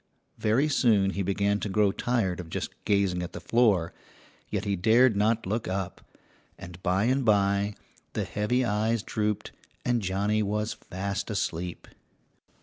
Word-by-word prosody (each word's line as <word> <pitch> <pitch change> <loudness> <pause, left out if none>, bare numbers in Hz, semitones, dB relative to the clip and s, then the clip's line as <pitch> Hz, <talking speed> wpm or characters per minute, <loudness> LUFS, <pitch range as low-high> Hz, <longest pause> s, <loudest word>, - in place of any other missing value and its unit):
Very 120 +8 +2
soon 110 -9 +3
he 100 - -3
began 100 +2 +1
to 105 - -3
grow 100 0 +3
tired 105 -6 -1
of 85 -2 -7
just - - -4
gazing 100 -3 +2
at 90 - -6
the - - -6
floor, 105 -9 +2 0.6
yet - - -2
he 100 -1 0
dared 110 +5 +4
not 110 +3 +1
look 110 +5 -2
up, 95 -1 -3 0.6
and 90 +1 -10
by 95 +2 +1
and 130 +3 +2
by 100 -1 +2 0.4
the - - -1
heavy 120 +5 0
eyes 110 +1 0
drooped 105 -1 -2 0.3
and 120 -1 +1
Johnny 100 +3 0
was 105 +1 -1
fast 100 +3 -4
asleep. 90 -3 -3
105 Hz, 150 wpm, -27 LUFS, 95-110 Hz, 0.6 s, dared